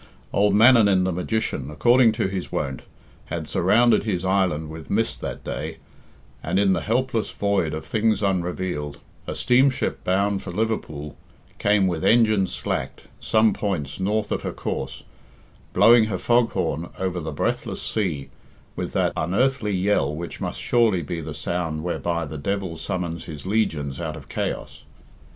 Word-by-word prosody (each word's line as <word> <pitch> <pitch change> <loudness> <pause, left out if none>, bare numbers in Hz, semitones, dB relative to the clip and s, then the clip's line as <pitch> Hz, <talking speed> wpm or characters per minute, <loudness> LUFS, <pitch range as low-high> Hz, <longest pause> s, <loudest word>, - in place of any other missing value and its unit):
Old 100 0 +3
Mannanin, 105 -5 +6
the 95 - +1
magician, 90 - -2
according 120 +9 +4
to 110 -2 0
his 95 -2 -4
wont, 65 -2 -2 0.4
had - - -5
surrounded 115 +6 +3
his 95 -5 -2
island 90 -5 +1
with 80 0 -9
mist 110 +2 0
that - - -5
day, - - -5 0.6
and, - - -1
in 100 -1 +4
the - - 0
helpless 115 0 0
void 100 -6 0
of 80 - -6
things 110 -1 +1
unrevealed, 90 -5 -2 0.3
a - - -3
steamship 130 +2 +2
bound 100 +2 +1
for - - -8
Liverpool 85 -8 -3 0.4
came 105 -1 +3
with 85 -4 -1
engines 110 -5 +4
slacked - - -3 0.2
some 110 -1 +3
points 90 -11 -3
north 105 +2 0
of - - -1
her - - -3
course, 65 0 -4 0.7
blowing 115 -1 +6
her 105 -4 -2
fog 120 +3 +3
horn 80 +4 -2
over 90 -1 -2
the 80 -1 -4
breathless 75 - -2
sea 80 -11 -2 0.5
with - - -4
that - - +1
unearthly 105 +5 +1
yell 95 -7 +1
which 85 +2 -7
must - - -3
surely 115 -8 +2
be 85 +3 -4
the 75 -1 -6
sound 80 -1 -2
whereby 85 -1 -1
the 75 0 -7
devil 95 +1 -2
summons 85 -1 -4
his 75 0 -8
legions 80 -10 -1
out - - -3
of - - -11
chaos. - - -4
95 Hz, 155 wpm, -24 LUFS, 80-110 Hz, 0.7 s, Mannanin